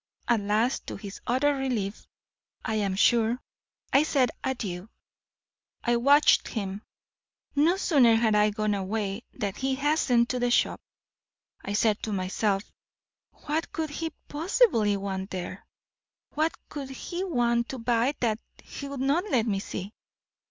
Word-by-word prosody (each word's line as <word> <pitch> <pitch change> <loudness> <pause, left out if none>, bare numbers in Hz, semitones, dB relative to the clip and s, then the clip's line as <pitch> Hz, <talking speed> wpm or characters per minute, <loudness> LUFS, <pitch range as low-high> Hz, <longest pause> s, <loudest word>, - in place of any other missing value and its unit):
At 235 -2 +3
last, 215 +5 0
to - - -4
his 200 0 -8
utter 265 +4 +3
relief, 245 -7 -3 0.6
I 220 - -1
am 200 -3 0
sure, 230 +3 +3 0.5
I 275 - +7
said 275 -5 +2
adieu. 205 -7 -3 0.9
"I 240 -1 +2
watched 285 +5 +5
him. 200 -2 -4 0.7
No 320 +6 +4
sooner 260 -12 +5
had 225 -1 +3
I 210 0 +4
gone 215 0 -1
away, 200 +2 -2
than 200 -2 -3
he 265 +5 -1
hastened 275 -4 +2
to 250 - -1
the 245 0 +1
shop. 240 - +2 0.8
I 200 - -4
said 215 0 +2
to 220 - -3
myself, 195 +1 0 0.8
what 310 +2 -1
could 315 -2 -3
he 325 +2 -3 0.2
possibly 290 - +2
want 195 -1 -4
there? 185 +1 -6 0.6
what 315 +2 0
could 280 -3 -6
he 345 +7 -5
want 240 -8 +1
to 265 - -4
buy 240 +3 +1
that 220 -3 +1 0.2
he 280 - -7
would 280 -2 -5
not 290 +8 +2
let 235 - +2
me 200 -4 0
see? 195 +1 -6
235 Hz, 145 wpm, -27 LUFS, 205-275 Hz, 0.9 s, I